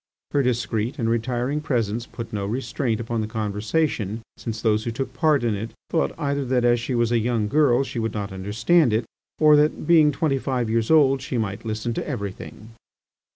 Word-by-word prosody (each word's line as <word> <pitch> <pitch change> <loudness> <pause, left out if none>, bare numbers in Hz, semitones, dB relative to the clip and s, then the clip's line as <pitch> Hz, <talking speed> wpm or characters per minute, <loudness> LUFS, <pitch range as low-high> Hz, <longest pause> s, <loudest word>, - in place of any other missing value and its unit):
Her 145 - +2
discreet 120 -2 -1
and 115 - -1
retiring 120 +5 -1
presence 120 -5 -1
put 115 -2 -8
no 100 -2 -2
restraint 120 0 -2
upon 115 0 -2
the 105 - -2
conversation, 110 +1 -1
since 115 -2 -5
those 110 -1 +1
who 115 - -2
took 130 +4 -4
part 155 -5 +2
in 115 -2 +1
it 110 +2 -5 0.2
thought 165 - 0
either 140 -2 -1
that 125 -1 +1
as 120 0 +4
she 125 +2 -3
was 120 -1 +1
a 120 - +3
young 115 -2 0
girl 135 -1 +3
she 130 - -5
would 110 -1 -2
not 100 -2 -4
understand 110 - +2
it, 110 +2 +1 0.3
or 150 -1 +6
that, 150 +1 +1
being 160 -3 +5
twenty 140 -1 0
five 125 -4 -1
years 115 -1 0
old, 135 -4 +5
she 130 -1 -3
might 110 0 -3
listen 110 +1 -2
to - - -4
everything. 100 +2 -6
120 Hz, 200 wpm, -23 LUFS, 110-135 Hz, 0.3 s, or